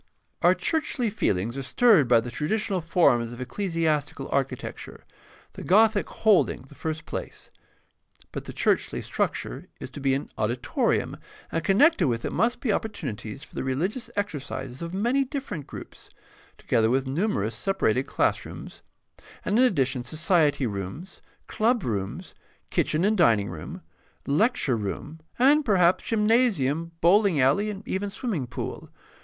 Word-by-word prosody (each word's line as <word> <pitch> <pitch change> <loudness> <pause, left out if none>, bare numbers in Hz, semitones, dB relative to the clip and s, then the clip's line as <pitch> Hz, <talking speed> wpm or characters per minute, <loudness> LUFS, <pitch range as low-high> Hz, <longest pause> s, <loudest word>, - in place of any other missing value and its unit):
Our - - +5
churchly 270 -8 -1
feelings 115 - 0
are - - -3
stirred 170 - +4
by 115 -1 +5
the 120 +1 -7
traditional 190 - -1
forms 155 -9 +2
of 120 - -10
ecclesiastical 155 -3 -1
architecture, 135 -2 -3 0.5
the - - -9
Gothic 215 +2 +3
holding 210 - +2
the 135 - -16
first 155 +2 -4
place. - - -7 0.8
But - - -6
the - - -6
churchly - - 0
structure - - -3
is 130 - -8
to 145 - -8
be 135 -1 +2
an 140 - -5
auditorium, 120 +3 0 0.3
and 165 - -1
con 195 - +2
nected 285 - +5
with 115 -1 -2
it - - -3
must 235 +6 +1
be 225 -6 +1
opportunities 140 - -4
for - - -15
the - - -3
religious 170 - -2
exercises 140 -9 -4
of 170 0 -5
many 240 +9 +1
different 265 - -5
groups, - - -10 0.5
together 110 -1 +1
with 130 +2 +1
numerous 135 - -1
separated 135 - 0
classrooms, - - -2 0.6
and 210 +4 +2
in - - +6
addition 135 - +1
society 155 -3 +2
rooms, 110 - -6 0.3
clubrooms, 150 - -1 0.4
kitchen 155 +4 +1
and 215 +1 +3
dining 110 - +4
room, 80 -1 -8 0.4
lecture 150 - +2
room, 110 +10 -5 0.2
and 285 +5 +5
perhaps 185 -7 +3
gymnasium, 210 - +2
bowling 190 -1 +4
alley, 140 +12 +3
and 205 0 -7
even 200 +2 -2
swimming 195 - -3
pool. - - -6
160 Hz, 140 wpm, -26 LUFS, 130-210 Hz, 0.8 s, in